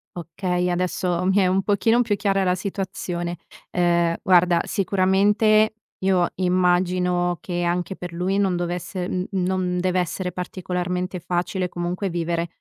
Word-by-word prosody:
Okay, 180 +1 -2
adesso 180 0 -1
mi 190 +2 +2
è 195 - +4
un 190 +1 +2
pochino 225 +4 +2
più 225 -4 +1
chiara 195 -2 +1
la 180 0 +2
situazione. 180 -2 -4 0.3
Ehm, 170 -1 +2
guarda 175 -2 +4
sicuramente 205 +2 +3 0.2
io 190 -2 +2
immagino 180 -1 +1
che 175 -1 -3
anche 175 +2 -1
per 180 -1 -7
lui 185 +3 -1
non 190 -3 +2
dovesse 175 +1 -3
n 185 0 -2
non 185 -1 0
dev'essere 180 0 -1
particolarmente 180 0 -3
facile 180 +2 -2
comunque 175 +3 -3
vivere, 170 0 -1
180 Hz, 135 wpm, -23 LUFS, 175-190 Hz, 0.3 s, è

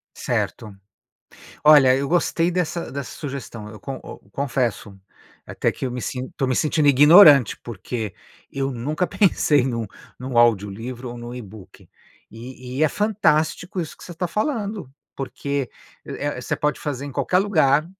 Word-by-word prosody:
Certo. 105 -3 -3 0.9
Olha, 145 -4 +7
eu 140 0 -2
gostei 170 0 +1
dessa 170 -1 -2
dessa 140 -2 -6
sugestão. 130 -7 -7
Eu 110 - -11
con 130 +6 -7 0.3
confesso 120 -7 -2 0.5
até - - -1
que - - -5
eu 125 - -3
me 125 - -5
sin 130 0 -4
estou 135 0 -3
me 130 - 0
sentindo 150 -1 +2
ignorante, 145 - +7
porque 110 -2 -5 0.4
eu 135 0 -2
nunca 150 +9 -2
pensei 155 -7 +3
em 125 -1 -1
um 115 -1 -2
em 115 +4 -15
um 125 -3 -1
áudio 110 -4 +4
livro 120 +4 -7
ou 120 - -8
em - - -10
um 120 +1 -7
ebook. 105 -4 -12 0.4
E 125 +3 -9
e 155 - +1
é 155 - +5
fantástico 185 -2 0
isso 160 - -6
que - - -16
você 175 - -9
está 180 +2 -3
falando, 210 - -3 0.2
porque 140 0 -4 0.7
você - - -3
pode 150 0 -1
fazer 140 -2 -4
em 140 - -7
qualquer 180 - +1
lugar 155 -7 +3
135 Hz, 165 wpm, -22 LUFS, 120-155 Hz, 0.9 s, Olha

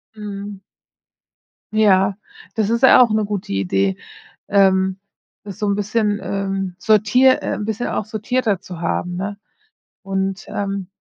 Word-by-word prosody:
Mhm. 205 -1 -7 1.1
Ja, 195 -2 +3 0.4
das 215 -2 0
ist 235 0 +1
ja 260 - +8
auch 235 -3 +4
'ne 215 -1 +1
gute 200 - -4
Idee, 95 0 0 0.5
ähm, 190 -1 +3 0.5
das 200 0 -9
so 210 - -1
'n 200 - +1
bisschen, 210 0 0
ähm, 195 -2 -3
sortier 220 +6 +4
äh, - - -1
'n 210 - -4
bisschen 220 +2 -2
auch - - -2
sortierter 220 -1 -1
zu 180 -3 -9
haben, 175 +1 -2
ne? 200 +2 -4 0.6
Und, 195 0 -3
ähm, 195 -2 -3
200 Hz, 140 wpm, -20 LUFS, 190-215 Hz, 1.1 s, ja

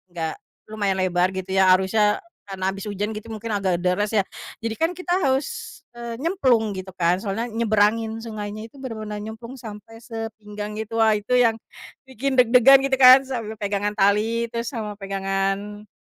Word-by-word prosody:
gak 160 -2 -2 0.4
lumayan 205 -3 -1
lebar 180 0 +2
gitu 190 0 -5
ya 190 -1 +5
arusnya 210 +3 +2 0.3
karena 190 -1 -3
habis 195 0 -7
hujan 205 +1 -3
gitu 215 +1 -8
mungkin 220 +1 -5
agak 190 -3 0
deras 205 +4 +1
ya, 215 - +3 0.4
jadi 230 -1 -3
kan 325 +5 0
kita 365 -1 -2
harus, 270 +1 -2 0.2
eee, 235 -1 -6
nyemplung 255 - +2
gitu 185 0 -6
kan 175 -1 +2
soalnya 210 +3 -2
nyebrangin 220 0 +1
sungainya 215 -1 -6
itu - - -26
bener-bener 215 -4 -5
nyemplung 230 +4 -8
sampai 220 -1 -10
sepinggang 215 -2 -7
gitu, 220 +1 -4
wah 220 -1 +5
itu 205 +4 -3
yang 230 -2 +4 0.5
bikin 265 +2 -2
deg-degan 250 +2 +7
gitu 275 - -2
kan 255 +1 +9
sambil 230 -5 -5
pegangan 205 0 -2
tali 220 +3 +1
terus 235 0 -3
sama 215 -5 -5
pegangan, 195 +1 -2
215 Hz, 165 wpm, -23 LUFS, 200-230 Hz, 0.5 s, kan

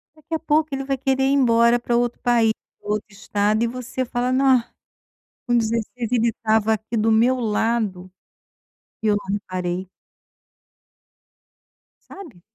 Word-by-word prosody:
Daqui 310 +1 -11
a - - -2
pouco 310 0 +1
ele 270 0 -2
vai 270 0 -2
querer 265 0 0
ir 270 - +3
embora 235 -3 +4
para 240 0 -1
outro 240 0 0
país, 235 -2 +3 0.3
para - - -11
outro 210 0 -1
estado 205 +2 0
e - - +2
você 255 +2 -4
fala: 245 +1 -1
"Ah, 260 -3 +3 0.8
com 240 -1 +2
16 230 +1 -1
ele 235 -1 +3
estava 220 -1 +1
aqui 220 +2 -5
do 220 +1 +2
meu 240 +4 +3
lado, 215 -4 -1 0.9
e - - -1
eu 210 -1 +3
não 200 -1 -3
reparei". 185 -2 -4 2.2
Sabe? 315 - -12
230 Hz, 150 wpm, -22 LUFS, 215-255 Hz, 2.2 s, embora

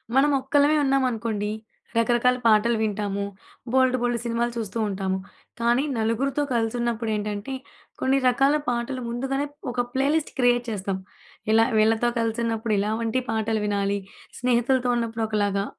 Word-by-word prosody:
మనం 285 +2 +5
ఒక్కలమే 285 +3 +3
ఉన్నామనుకోండి, 230 -6 0 0.5
రకరకాల 240 +2 +3
పాటలు 225 +1 +4
వింటాము. 205 -2 -1 0.5
బోలెడు, 260 0 +3
బోలెడు 240 -1 0
సినిమాలు 235 0 0
చూస్తూ 225 -1 -4
ఉంటాము. 190 -1 -1 0.4
కానీ, 240 +3 +3
నలుగురితో 245 +6 0
కలిసి 225 -1 0
ఉన్నప్పుడు 235 -1 -1
ఏంటంటే 210 +4 -3 0.5
కొన్ని 265 +1 +2
రకాల 270 +4 +4
పాటలు 245 +2 -1
ముందుగానే 270 +4 -1 0.3
ఒక 245 0 0
ప్లేలిస్ట్ 285 +4 +1
క్రియేట్ 245 -1 +3
చేస్తాం. 195 -3 -2 0.5
ఇలా 225 +1 +5
వీళ్ళతో 220 +2 +3
కలిసినప్పుడు 225 -1 -1
ఇలా 205 +2 0
వంటి 230 +2 0
పాటలు 220 -1 0
వినాలి. 200 -1 0 0.4
స్నేహితులతో 250 +1 +2
ఉన్నప్పుడు 230 -1 -2
ఒకలాగా, 205 -2 0
235 Hz, 130 wpm, -25 LUFS, 215-250 Hz, 0.5 s, మనం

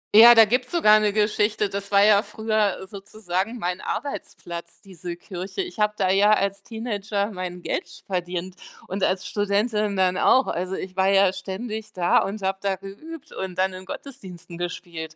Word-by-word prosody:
Ja, 235 +2 +10
da 225 -1 +9
gibt 250 +4 +1
es - - -15
sogar 215 -11 +5
'ne 210 -1 +2
Geschichte. 210 0 +1
Das 200 0 -5
war 200 0 +6
ja 210 -1 +6
früher 215 -2 -1
sozusagen 200 +2 -4
mein 180 -2 -3
Arbeitsplatz, 170 -11 -6
diese 180 -3 -8
Kirche. 185 - -6
Ich 355 -10 -9
habe 210 0 +2
da 190 -1 +2
ja 205 +2 +5
als 200 -1 0
Teenager 210 -2 -3
mein 180 -2 -6
Geld - - -4
verdient 180 0 -3 0.3
und 190 +1 -3
als 190 0 +1
Studentin 205 +1 0
dann 185 -1 +2
auch. 260 - +5
Also, 185 +2 -3
ich 185 -1 -7
war 190 0 +2
ja 195 -1 +4
ständig 215 +3 -6
da 175 -1 +3
und 200 +1 -3
habe 190 0 -1
da 195 -1 0
geübt 210 - -10
und 190 -1 -5
dann 190 0 +1
in 185 +1 -9
Gottesdiensten 180 -8 -9
gespielt. 170 -2 -6
200 Hz, 180 wpm, -24 LUFS, 185-215 Hz, 0.3 s, Ja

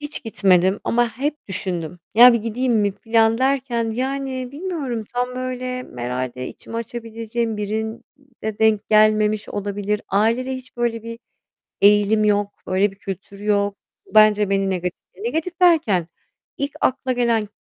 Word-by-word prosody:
Hiç 295 0 -5
gitmedim 190 -3 +3
ama 240 0 +2
hep 295 +3 -3
düşündüm. 180 -3 -4 0.2
Ya, 245 +2 +9
bir 235 - +2
gideyim 235 +3 -1
mi 205 -3 +2
filan 225 +1 +2
derken, 260 -4 0
yani, 260 +1 -3
bilmiyorum, 285 - -4
tam 250 +1 -1
böyle 255 0 -3 0.2
herhâlde 125 +1 -3
içimi 230 - -9
açabileceğim 230 -1 -4
birine 220 +2 -3 0.6
denk 220 -1 +2
gelmemiş 215 0 +3
olabilir. 205 0 -3
Ailede 230 +6 +1
hiç 255 -1 -10
böyle 235 -2 -1
bir 230 0 -7 0.6
eğilim 210 +1 +5
yok, 205 -1 +2 0.2
öyle 190 +2 +2
bir 195 - -16
kültür 195 0 -8
yok. 205 -1 +1 0.4
Bence 210 -1 +5
beni 195 -1 +1
negatif, 180 -1 -3 0.2
negatif 320 - -3
derken, 310 - +4 0.5
ilk 280 +1 -2
akla 260 0 +1
gelen 235 -3 +1
220 Hz, 135 wpm, -21 LUFS, 205-250 Hz, 0.6 s, Ya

